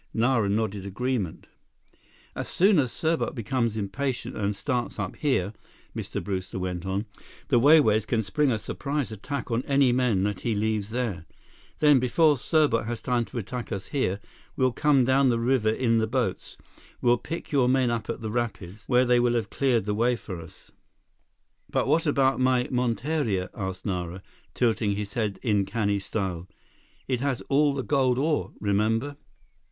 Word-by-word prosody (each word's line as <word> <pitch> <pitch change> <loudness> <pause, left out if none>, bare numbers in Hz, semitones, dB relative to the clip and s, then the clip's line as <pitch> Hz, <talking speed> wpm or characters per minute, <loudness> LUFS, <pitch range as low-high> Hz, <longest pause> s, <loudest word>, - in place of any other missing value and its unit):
Nara 115 -3 +2
nodded 105 -1 -1
agreement. 105 -2 -3 0.9
"As - - -4
soon 190 -1 +4
as 130 -4 +1
Serbot 160 -2 -1
becomes 115 -1 -1
impatient 125 +6 -3
and 100 -1 -1
starts 120 +5 -2
up 95 -4 -4
here," 115 -9 0 0.4
Mr. - - -4
Brewster 95 -2 -4
went 90 -1 -4
on, 95 +3 -1 0.4
"the 120 - +4
Wai 150 +6 +7
Wais 110 -6 +2
can 110 -2 +1
spring 140 +9 +1
a 110 - +1
surprise 140 +5 -3
attack 125 +6 -5
on 115 +1 +1
any 140 -2 +4
men 120 -6 +2
that 105 -2 -1
he 115 -2 -1
leaves 105 -1 -1
there. 110 -9 -3 0.5
Then, 150 -3 +5
before 150 +5 +3
Serbot 140 -4 +1
has 120 -1 -3
time 120 -2 0
to - - -9
attack 120 +2 -5
us 95 -1 -5
here, 100 -9 -1 0.4
we'll 130 -1 +2
come 140 0 +3
down 130 +1 +4
the 120 - +2
river 115 -1 +2
in 115 0 +2
the 110 - 0
boats. 120 -5 -2 0.4
We'll 120 -1 +3
pick 165 +2 -6
your 130 -4 +3
men 130 -2 +2
up 115 -1 -3
at - - -4
the 110 -1 -4
rapids, 105 -4 -4
where 125 0 +4
they 125 0 +4
will 120 0 +2
have 110 -4 -2
cleared 125 -7 +1
the 105 - -1
way 120 +4 +2
for 95 -5 -7
us." 80 - -15 1.0
"But - - 0
what 160 +3 +2
about 135 -2 +2
my 130 -1 +3
monteria?" 125 -4 -1
asked 95 -2 -5
Nara, 90 -2 -3 0.3
tilting 110 -4 +1
his 100 -1 -5
head 105 -4 -1
in 105 -5 +2
canny 100 -1 -1
style. 95 -3 -3 0.6
"It 125 -2 -1
has 140 -3 -1
all 145 0 +3
the 135 - -2
gold 130 -3 +2
ore. 150 +2 0
Remember?" 110 +7 0
120 Hz, 175 wpm, -26 LUFS, 105-130 Hz, 1.0 s, Wai